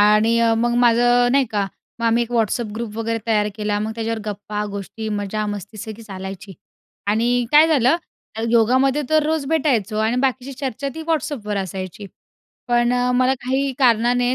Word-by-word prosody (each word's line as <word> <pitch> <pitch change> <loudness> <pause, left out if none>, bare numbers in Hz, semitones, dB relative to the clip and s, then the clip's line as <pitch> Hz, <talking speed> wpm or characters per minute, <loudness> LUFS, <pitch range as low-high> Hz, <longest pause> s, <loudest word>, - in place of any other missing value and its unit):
आणि 215 +2 +4
अ, 230 -1 +3
मग 240 +1 +1
माझं 245 +1 +4
नाही 275 -1 +4
का, 205 -2 0 0.3
मग 230 - +1
आम्ही 230 +1 +3
एक 235 - -5
WhatsApp 225 -1 0
ग्रुप 220 -1 -5
वगैरे 225 0 -1
तयार 210 -2 +2
केला. 210 -1 -1
मग 215 +1 -2
त्याच्यावर 225 0 -2
गप्पा, 210 0 -4
गोष्टी, 200 +2 -6
मजा, 210 0 -2
मस्ती, 205 +1 -6
सगळी 220 0 -7
चालायची 195 -1 -8 0.5
आणि 240 +4 +2
काय 300 +2 +8
झालं 285 0 +4 0.5
योगामध्ये 260 +5 +3
तर 310 0 +4
रोज 315 -2 0
भेटायचो 260 -9 +1
आणि 230 +3 +1
बाकीची 265 0 -1
चर्चा 270 0 -4
ती 320 - -6
WhatsAppवर 275 -10 -2
असायची. 190 +2 -7 0.6
पण 240 0 +2
अ, 250 0 +1
मला 255 +1 +3
काही 265 +2 0
कारणाने 245 0 +3
230 Hz, 165 wpm, -21 LUFS, 210-255 Hz, 0.6 s, काय